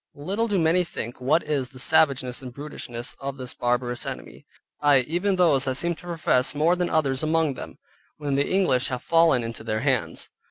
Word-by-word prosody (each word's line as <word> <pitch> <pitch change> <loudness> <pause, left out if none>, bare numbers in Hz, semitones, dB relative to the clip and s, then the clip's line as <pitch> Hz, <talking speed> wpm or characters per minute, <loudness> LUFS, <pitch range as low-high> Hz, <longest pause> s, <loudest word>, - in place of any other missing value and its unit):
Little 195 +10 -2
do 205 -3 0
many 170 +1 +3
think 120 -8 -7
what 150 +6 +2
is 145 -4 -2
the 130 - -15
savageness 135 -3 +2
and 130 -1 -8
brutishness 120 -3 -7
of 140 0 -5
this 125 -2 -6
barbarous 120 0 -1
enemy, - - -8 0.3
Ay, 145 -3 +5
even 175 +9 0
those 155 -7 +3
that 130 -1 -1
seem 170 +5 +1
to 175 - -13
profess 155 -5 +1
more 160 +4 +3
than 180 -1 -1
others 135 -4 +1
among 155 -2 +1
them, - - -9 0.4
when 145 -2 -3
the 140 +1 +1
English 180 -10 +2
have 125 -2 -4
fallen 165 -7 +4
into 115 -1 -6
their 110 -1 -2
hands. 130 -3 -1
140 Hz, 195 wpm, -25 LUFS, 125-165 Hz, 0.4 s, Ay